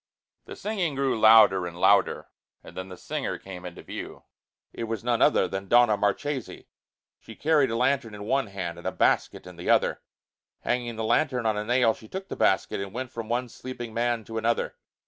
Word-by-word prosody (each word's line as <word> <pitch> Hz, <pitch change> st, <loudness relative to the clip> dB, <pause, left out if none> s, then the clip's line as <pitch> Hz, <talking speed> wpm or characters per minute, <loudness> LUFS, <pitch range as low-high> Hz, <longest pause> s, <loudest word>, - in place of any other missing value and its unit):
The -, -, -9 dB
singing 190 Hz, -8 st, -2 dB
grew 135 Hz, -4 st, 0 dB
louder 110 Hz, -5 st, +6 dB
and 85 Hz, 0 st, -9 dB
louder, 100 Hz, 0 st, +3 dB, 0.3 s
and -, -, -13 dB
then 95 Hz, 0 st, -6 dB
the 90 Hz, -, -9 dB
singer -, -, -4 dB
came 90 Hz, -2 st, -10 dB
into 90 Hz, -1 st, -9 dB
view. -, -, -8 dB, 0.5 s
It 115 Hz, -, -4 dB
was 115 Hz, -2 st, -4 dB
none 120 Hz, -1 st, 0 dB
other -, -, +4 dB
than 95 Hz, +2 st, -5 dB
Donna 120 Hz, 0 st, +5 dB
Marchesi! 115 Hz, +6 st, -2 dB, 0.5 s
She 110 Hz, -, -12 dB
carried 150 Hz, -4 st, +2 dB
a 115 Hz, -, -2 dB
lantern 125 Hz, -3 st, 0 dB
in 105 Hz, -, -8 dB
one 135 Hz, +4 st, 0 dB
hand 90 Hz, -4 st, -5 dB
and -, -, -6 dB
a -, -, 0 dB
basket -, -, +1 dB
in 90 Hz, -1 st, -11 dB
the 85 Hz, -, -5 dB
other. -, -, +2 dB, 0.6 s
Hanging 120 Hz, -2 st, -2 dB
the 110 Hz, -, -4 dB
lantern 125 Hz, +1 st, +1 dB
on 110 Hz, -1 st, +2 dB
a 105 Hz, -, -2 dB
nail, 120 Hz, 0 st, +3 dB
she 110 Hz, -, -15 dB
took 190 Hz, -, -7 dB
the -, -, -4 dB
basket -, -, +1 dB
and 100 Hz, +2 st, -7 dB
went 130 Hz, 0 st, -4 dB
from 115 Hz, -3 st, -6 dB
one 125 Hz, +1 st, -1 dB
sleeping 120 Hz, -1 st, -8 dB
man 120 Hz, 0 st, 0 dB
to 110 Hz, +1 st, -5 dB
another. 115 Hz, +1 st, -1 dB
115 Hz, 205 wpm, -26 LUFS, 100-125 Hz, 0.6 s, louder